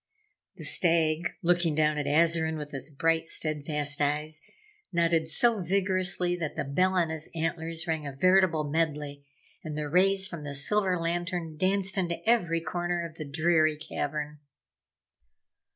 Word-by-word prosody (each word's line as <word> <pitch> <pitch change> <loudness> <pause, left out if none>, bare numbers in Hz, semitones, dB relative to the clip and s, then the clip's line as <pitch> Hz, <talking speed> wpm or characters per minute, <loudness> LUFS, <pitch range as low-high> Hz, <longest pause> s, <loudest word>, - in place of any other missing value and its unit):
The - - -9
Stag, 165 -1 +2
looking 175 -2 +2
down 155 -1 +2
at 145 - -3
Azarine 160 +1 +3
with 150 -1 -7
his 135 +2 -5
bright, 160 +3 0
steadfast 150 -2 -1
eyes, 150 +2 0 0.5
nodded 170 -2 +2
so 230 +5 +2
vigorously 185 -1 +1
that 160 -4 -4
the - - -2
bell 180 +7 +1
on 170 -3 +1
his 160 -1 -4
antlers 165 0 -3
rang 160 -3 -2
a - - -4
veritable 185 +1 +3
medley, 150 -2 -2 0.4
and 155 -1 -5
the 150 -1 -2
rays 190 +4 +3
from 170 -5 -7
the 145 -1 -5
silver 185 +5 +1
lantern 170 -1 -3
danced 190 +3 +1
into 175 +3 -3
every 175 -8 +2
corner 175 0 -2
of 165 -1 -10
the 155 - -5
dreary 155 +1 +2
cavern. 150 -1 -4
165 Hz, 150 wpm, -28 LUFS, 150-175 Hz, 0.5 s, Azarine